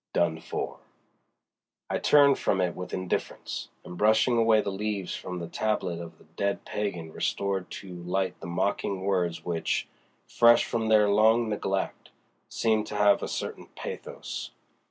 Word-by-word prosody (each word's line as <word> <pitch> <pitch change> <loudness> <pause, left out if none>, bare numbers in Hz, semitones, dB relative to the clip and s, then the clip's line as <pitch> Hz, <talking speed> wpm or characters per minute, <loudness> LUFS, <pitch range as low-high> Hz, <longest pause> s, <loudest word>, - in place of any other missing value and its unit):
DONE 80 -2 +1
FOR. - - -5 1.1
I - - -1
turned 140 -2 +5
from 95 - +1
it 90 -2 0
with 90 - -6
indifference, 95 -1 -3 0.2
and 90 0 -8
brushing 110 +3 +4
away 115 -1 +5
the 100 - -1
leaves 100 -1 -3
from 90 - -6
the 85 -1 -5
tablet 95 -3 -1
of 85 -2 -9
the - - -20
dead 100 +5 -3
pagan 90 -6 -3
restored 95 -2 -1
to 90 -3 -8
light 95 +2 -1
the - - -8
mocking 95 +2 -1
words 90 -3 0
which, 85 -2 -1 0.4
fresh 120 0 +5
from 115 -1 -1
their 105 -1 +5
long 110 +3 +4
neglect, 95 -2 -2 0.4
seemed 110 -2 +1
to 105 - -6
have 105 0 +4
a - - -2
certain - - -5
pathos. - - -6
100 Hz, 155 wpm, -28 LUFS, 90-110 Hz, 1.1 s, turned